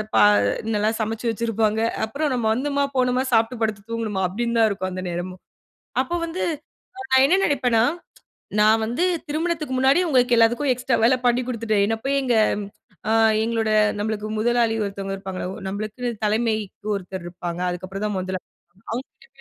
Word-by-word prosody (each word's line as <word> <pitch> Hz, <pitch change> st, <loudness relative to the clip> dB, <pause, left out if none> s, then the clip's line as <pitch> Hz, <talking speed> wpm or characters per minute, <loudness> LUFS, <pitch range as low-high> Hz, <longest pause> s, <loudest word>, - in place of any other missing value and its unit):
பா -, -, +6 dB, 0.5 s
நல்லா 210 Hz, +1 st, +2 dB
சமைச்சு 225 Hz, +2 st, -2 dB
வச்சிருப்பாங்க 225 Hz, -1 st, 0 dB, 0.2 s
அப்புறம் 285 Hz, +5 st, -2 dB
நம்ம 240 Hz, -3 st, -1 dB
வந்தம்மா, 280 Hz, +3 st, 0 dB
போனோமா, 255 Hz, 0 st, +2 dB
சாப்பிட்டு 225 Hz, +1 st, +2 dB
படுத்து 215 Hz, -2 st, -1 dB
தூங்குனம்மா, 215 Hz, -4 st, -2 dB
அப்பிடின்னு 235 Hz, +5 st, -2 dB
தான் 220 Hz, -, +5 dB
இருக்கும் 185 Hz, -1 st, -3 dB
அந்த 185 Hz, 0 st, -5 dB
நேரமும். 180 Hz, +2 st, -5 dB, 0.6 s
அப்போ 265 Hz, +6 st, -4 dB
வந்து 335 Hz, +3 st, -4 dB, 0.7 s
நான் 265 Hz, 0 st, +6 dB
என்ன 370 Hz, +6 st, +4 dB
நினைப்பேன்னா, 250 Hz, -6 st, +2 dB, 0.8 s
நான் 220 Hz, +1 st, +5 dB
வந்து 245 Hz, +10 st, -1 dB, 0.3 s
திருமணத்துக்கு 310 Hz, -3 st, -2 dB
முன்னாடி, 270 Hz, +6 st, +4 dB
உங்களுக்கு 245 Hz, -3 st, +4 dB
எல்லாத்துக்கும் 240 Hz, +5 st, +3 dB
எக்ஸ்ட்ரா 250 Hz, 0 st, 0 dB
வேலை 255 Hz, +2 st, +4 dB
பண்ணி 245 Hz, +1 st, +3 dB
கொடுத்துட்டேன். 220 Hz, -4 st, 0 dB
என்ன 225 Hz, 0 st, 0 dB
போய் 275 Hz, 0 st, +2 dB
எங்க 245 Hz, -3 st, +1 dB, 0.7 s
அ -, -, +2 dB, 0.3 s
எங்களோட 225 Hz, -1 st, 0 dB, 0.3 s
நம்மளுக்கு 215 Hz, 0 st, -2 dB
முதலாளி 235 Hz, 0 st, +2 dB
ஒருத்தவங்க 195 Hz, 0 st, -4 dB
இருப்பாங்கள. 190 Hz, -1 st, -6 dB, 0.2 s
நம்மளுக்குன்னு 215 Hz, +5 st, -4 dB, 0.2 s
தலைமைக்கு 215 Hz, -1 st, -1 dB
ஒருத்தர் 190 Hz, -2 st, -6 dB
இருப்பாங்க, 175 Hz, 0 st, -5 dB
அதுக்கப்புறம் 185 Hz, +3 st, -5 dB
தான் 210 Hz, -, -2 dB
முதலா 185 Hz, 0 st, -3 dB, 0.5 s
அவுங்ககிட்ட 265 Hz, +3 st, -7 dB
225 Hz, 150 wpm, -23 LUFS, 205-250 Hz, 0.8 s, பா